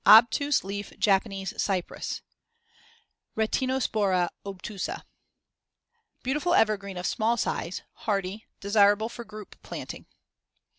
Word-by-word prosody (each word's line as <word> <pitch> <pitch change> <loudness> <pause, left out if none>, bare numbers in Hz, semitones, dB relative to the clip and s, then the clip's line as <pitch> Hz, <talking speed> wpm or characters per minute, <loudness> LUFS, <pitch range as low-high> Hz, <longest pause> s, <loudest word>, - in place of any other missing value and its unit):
Obtuse 245 +6 +7
leaf 200 +1 -5
Japanese 195 -1 +1
cypress 185 -3 -2 1.1
(Retinospora 220 -6 +1
obtusa) 200 - -5 1.2
Beautiful 300 +7 +1
evergreen 200 -3 +2
of 180 - -4
small 225 +5 +1
size; 180 -4 -2
hardy; 200 0 -2
desirable 205 +2 +4
for 235 - -7
group 215 -2 -11
planting. - - -7
210 Hz, 90 wpm, -28 LUFS, 195-230 Hz, 1.2 s, Obtuse